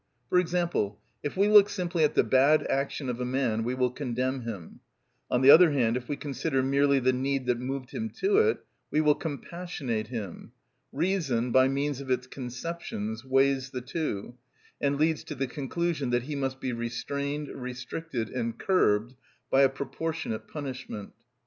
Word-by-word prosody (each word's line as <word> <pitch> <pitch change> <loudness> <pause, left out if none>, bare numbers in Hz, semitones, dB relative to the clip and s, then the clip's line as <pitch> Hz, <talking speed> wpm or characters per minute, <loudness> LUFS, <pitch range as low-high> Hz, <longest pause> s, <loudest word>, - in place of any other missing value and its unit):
For 180 - +4
example, 170 - 0 0.2
if 145 +4 -4
we 200 +2 +4
look 210 -1 +7
simply 175 -3 -1
at 150 - +2
the - - +5
bad 140 +4 +4
action 140 0 -1
of 125 0 -3
a - - 0
man 125 -3 0
we 125 +2 -1
will 125 -1 +1
condemn 130 0 -2
him; 105 -8 -7 0.5
on 125 +1 +1
the 135 - +10
other 170 +2 +9
hand, 120 -4 +2
if 125 -1 -5
we 145 - 0
consider 135 -1 -1
merely 140 +1 +3
the 130 0 +3
need 135 +1 -1
that 125 -1 +1
moved 130 +1 -4
him 225 +1 -3
to 400 +2 +3
it, 445 0 +2 0.2
we 150 - +1
will 150 -1 +5
compassionate 145 -7 -4
him: 110 -7 -7 0.4
reason, 140 -8 0
by 130 +1 +6
means 140 0 -1
of 135 - -8
its 125 0 +1
conceptions, 125 -4 -5
weighs 135 0 +2
the 125 -1 -5
two, 125 - -3 0.5
and 140 0 +1
leads 155 +1 +1
to 150 - -6
the 135 0 -1
conclusion 145 +1 -2
that 120 0 +1
he 145 +3 -5
must 135 -1 -2
be 130 -2 -2
restrained, 140 +5 -3
restricted, 125 0 -5
and 115 -2 -3
curbed 120 - +2 0.4
by 135 - +5
a 135 - +6
proportionate 140 -2 -4
punishment. 130 -8 -6
135 Hz, 175 wpm, -28 LUFS, 125-150 Hz, 0.5 s, the